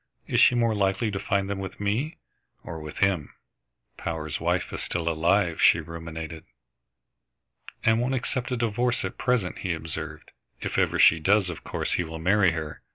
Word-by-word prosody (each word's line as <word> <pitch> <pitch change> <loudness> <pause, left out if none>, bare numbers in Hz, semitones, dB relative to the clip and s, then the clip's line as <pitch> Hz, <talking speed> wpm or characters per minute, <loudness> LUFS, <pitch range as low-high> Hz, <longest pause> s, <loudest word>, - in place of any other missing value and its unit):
Is - - +1
she 125 - +6
more 115 -2 +2
likely 100 +1 +1
to 95 - -3
find 100 0 0
them 100 -1 -3
with 95 -1 -6
me 110 +10 -1 0.5
or 80 - -6
with 75 -1 -8
him?" 95 -7 +1 0.6
"Power's 80 -3 -3
wife - - 0
is - - -4
still 85 -1 -3
alive," 85 +2 +2
she - - +6
ruminated. 80 -1 -7 1.4
"And 110 +1 +4
won't 130 +2 0
accept 125 0 -2
a 125 - 0
divorce 120 0 0
at 95 - -6
present," 125 -8 0
he 90 -3 -1
observed. 80 -1 -6 0.3
"If - - -2
ever - - +2
she 80 - +6
does, 95 +2 +3
of 85 - -9
course - - -3
he 90 - +1
will 80 0 -7
marry 95 +3 +4
her. 80 -2 -5
95 Hz, 175 wpm, -26 LUFS, 80-105 Hz, 1.4 s, she